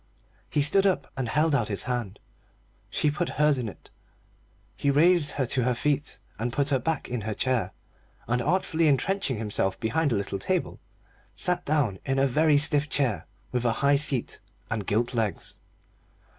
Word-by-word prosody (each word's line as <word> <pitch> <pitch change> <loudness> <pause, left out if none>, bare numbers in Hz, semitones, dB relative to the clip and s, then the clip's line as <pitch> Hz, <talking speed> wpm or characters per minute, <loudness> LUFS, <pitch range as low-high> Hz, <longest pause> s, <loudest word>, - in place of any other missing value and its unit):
He 145 - +2
stood 195 +7 +4
up 160 -8 -1
and 130 -4 -3
held 150 +5 +2
out 120 -6 +2
his 100 -2 -3
hand. 120 -6 -3 0.7
She 150 - +1
put 170 +4 -2
hers 150 -2 +3
in 115 -3 -3
it, - - -15 0.8
he 140 - 0
raised 155 +1 +4
her 135 - -1
to 125 +2 0
her 125 0 +1
feet 145 +3 -1 0.2
and 120 +2 -2
put 140 +2 +1
her 135 -2 +2
back 155 +4 -2
in 120 -2 -3
her 110 0 -4
chair, 120 -8 0 0.6
and 120 +1 0
artfully 165 +1 +1
entrenching 150 - +1
himself 105 -3 -1
behind 145 +6 0
a - - +2
little 100 -1 -3
table, 185 - -2 0.6
sat 180 -1 0
down 140 -11 0
in 135 0 -1
a 135 - +3
very 150 +3 +3
stiff 145 0 +2
chair 130 -7 0 0.2
with 125 -1 -1
a 120 -2 +2
high 140 0 +5
seat 140 -4 +1 0.3
and 110 -4 -3
gilt 115 +4 0
legs. 110 -6 -3
135 Hz, 175 wpm, -26 LUFS, 115-150 Hz, 0.8 s, high